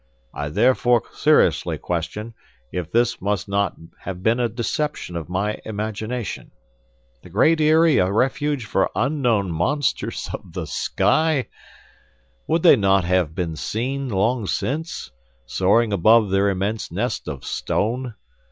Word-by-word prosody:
I 75 0 -4
therefore 120 +5 +3
seriously - - +3
question, 90 +7 -4 0.4
if 90 -2 -3
this 120 +1 +1
must 100 0 -1
not 100 0 0 0.2
have 95 -1 -7
been 115 +3 +2
a 120 -1 +1
deception 120 - -3
of 80 -2 -5
my 100 +4 -1
imagination. 110 +2 -4 0.7
The - - -14
Great 155 - +3
Eyrie 155 0 +5
a 90 +1 +2
refuge 135 +3 0
for 95 -3 +1
unknown 120 - +1
monsters 135 - -1
of - - -8
the - - -4
sky! 145 +7 +1 1.0
Would 165 0 +1
they 170 - +8
not 100 -2 +3
have 85 -3 +1
been 85 -3 -2
seen 130 - -3
long 110 +2 0
since, 145 - -3 0.3
soaring 105 - +2
above 110 +2 +4
their 100 +1 +3
immense 100 +3 -2
nest - - -2
of - - -6
stone? 120 +2 -2
110 Hz, 135 wpm, -22 LUFS, 95-125 Hz, 1.0 s, they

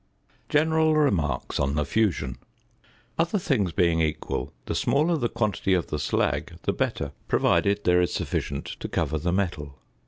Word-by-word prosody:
~General 160 +1 +3
Remarks 85 - +1
on 70 +1 0
the 75 -1 0
Fusion.~ 80 - 0 0.8
Other 170 +5 +2
things 120 - 0
being 85 -1 +2
equal, 75 -1 -2
the - - -2
smaller 155 +5 +2
the 120 -7 0
quantity 100 -3 0
of 90 - -2
the 75 - -1
slag - - 0
the - - 0
better, - - -2 0.2
provided 100 +1 +2
there 90 0 +4
is 90 - 0
sufficient - - -2
to - - -5
cover 80 - -1
the 85 +3 -1
metal. 85 -7 -2
95 Hz, 155 wpm, -26 LUFS, -, 0.8 s, there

